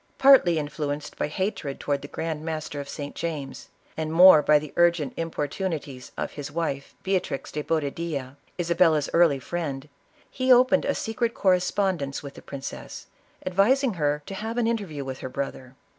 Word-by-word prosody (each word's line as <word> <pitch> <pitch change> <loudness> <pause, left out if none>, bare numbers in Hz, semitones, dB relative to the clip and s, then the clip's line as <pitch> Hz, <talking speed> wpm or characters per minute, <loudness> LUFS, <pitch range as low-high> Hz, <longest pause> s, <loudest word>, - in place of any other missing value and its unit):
Partly 265 -12 +6
influenced 150 -1 -4
by - - -1
hatred 155 -4 -3
towards 140 -1 -1
the 145 - -8
grand 155 0 -4
master 155 -2 -4
of 140 0 -6
St. 145 0 -6
James, 145 -6 -5 0.3
and 155 0 -3
more 170 -1 +8
by 150 0 +5
the 150 0 -6
urgent 170 -5 +3
importunities 155 -4 -4
of - - -3
his 145 -1 -7
wife, 145 -4 -3
Bcatriz 185 -8 -2
de 150 - -3
Boba 150 -2 -1
dilla, 140 -6 -4 0.2
Isabella's 170 -3 +2
early 165 -5 +5
friend, 145 -2 -4 0.4
he 255 0 +1
opened 255 +2 +5
a 280 - 0
secret 230 +1 -2
cor 190 -2 +4
respondence 180 -6 -1
with 140 -1 -8
the - - -12
princess, 135 -1 -8 0.4
advising 230 +8 +3
her 150 -3 0
to - - -7
have 220 +4 -4
an 240 - +2
interview 195 -12 -2
with 130 0 -5
her 130 - -5
brother. 130 -1 -5
160 Hz, 170 wpm, -25 LUFS, 145-185 Hz, 0.4 s, more